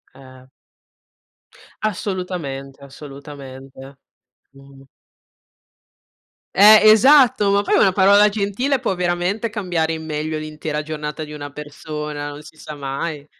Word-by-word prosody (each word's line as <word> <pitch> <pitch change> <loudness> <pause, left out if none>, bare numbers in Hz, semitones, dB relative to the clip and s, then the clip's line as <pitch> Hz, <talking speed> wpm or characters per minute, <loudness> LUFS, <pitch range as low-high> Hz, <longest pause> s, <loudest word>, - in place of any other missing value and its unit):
Eh. 130 -1 -16 1.4
Assolutamente, 180 - -4
assolutamente. 135 -1 -12 0.6
Mh. 135 0 -17 1.7
Eh, 210 +2 +8
esatto, 255 -2 +5
ma 200 0 +2
poi 205 - +1
una 190 - +3
parola 200 +2 +5
gentile 210 +7 -1
può 240 -6 -1
veramente 180 +5 -2
cambiare 175 -7 -2
in 160 0 -6
meglio 155 0 -4
l'intera 155 0 -5
giornata 150 0 -6
di 150 - -10
una 145 -1 -7
persona, 150 0 -7
non 145 0 -9
si 155 +1 -16
sa 155 -1 -9
mai. 145 +2 -5
155 Hz, 110 wpm, -20 LUFS, 145-200 Hz, 1.7 s, Eh